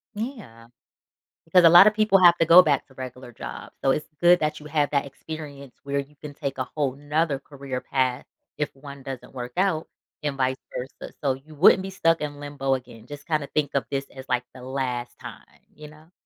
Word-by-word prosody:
Yeah. 205 - -7 0.8
Because 180 +1 +5
a 165 - +9
lotta 185 +5 +9
people 215 -2 +3
have 175 -1 +7
to 165 - +3
go 170 +3 +9
back 145 -5 +1
to 135 - -20
regular 125 -1 -8
jobs, - - -8
so 135 - +4
it's 150 - -2
good 175 +1 +6
that 150 0 -1
you 150 - -11
have 145 -2 0
that 140 -1 +1
experience 140 -2 -9
where 140 0 -2
you 140 +2 -8
can 150 0 -9
take 140 -2 -5
a 130 - 0
whole 140 -4 0
'nother 145 0 -1
career 135 -2 -6
path 130 -2 -1 0.3
if 150 - -3
one 140 0 -11
doesn't 135 -2 -8
work 125 -1 -6
out 185 -4 +1 0.3
and 145 -2 -2
vice 130 0 +1 0.2
versa, 130 +2 -7
so 135 - +2
you 145 +4 -13
wouldn't 185 +4 +6
be 195 - -5
stuck 165 -4 +1
in 145 -1 -4
limbo 145 -2 -2
again. 120 -3 -10
Just 145 -1 -9
kinda 155 -4 -1
think 145 -1 -1
of 140 - 0
this 140 -1 -2
as, 130 0 -10
like, 125 -1 0
the 130 - -12
last 125 -2 -4
time, - - -12
you 150 0 -11
know? 155 +2 -17
140 Hz, 210 wpm, -25 LUFS, 130-155 Hz, 0.8 s, a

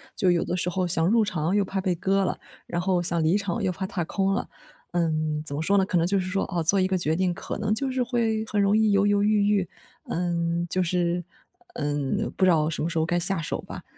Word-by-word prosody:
就 185 -2 +3
有 170 - +2
的 180 - -2
时 180 0 -1
候 180 0 0
想 165 -1 +1
入 225 +3 +4
场 180 -3 -1
又 205 - +3
怕 195 0 -3
被 190 -1 0
割 195 +3 +1
了， - - -2 0.3
然 175 0 -2
后 185 -1 +1
想 170 -1 0
离 165 +6 +3
场 200 +1 -2
又 190 - +1
怕 190 +2 -4
踏 185 -2 -3
空 195 +3 0
了。 - - -2 0.4
嗯， 155 -3 0
怎 140 - -4
么 150 - -2
说 195 +5 +2
呢， 190 - +3
可 185 -3 +1
能 165 - +1
就 200 +1 +2
是 185 - -2
说， 195 +1 0
哦， 175 -2 0
做 195 +5 +3
一 185 - +2
个 190 - 0
决 160 -2 0
定 185 0 +1
可 - - -6
能 210 0 0
就 265 +3 -1
是 255 0 -1
会 230 -3 0
很 210 - -1
容 200 +1 +3
易 220 -1 +3
犹 200 0 +3
犹 205 0 +3
豫 205 0 +3
豫， 200 -4 +1 0.4
嗯， 170 0 -1
就 185 - 0
是， 175 0 0 0.5
嗯， 145 +7 -1
不 - - +1
知 - - +5
道 155 -3 +3
什 - - -3
么 160 - 0
时 170 - -3
候 160 - +2
该 175 +1 0
下 180 +1 0
手 155 - -3
吧。 - - -9
185 Hz, 285 characters per minute, -25 LUFS, 170-200 Hz, 0.5 s, 知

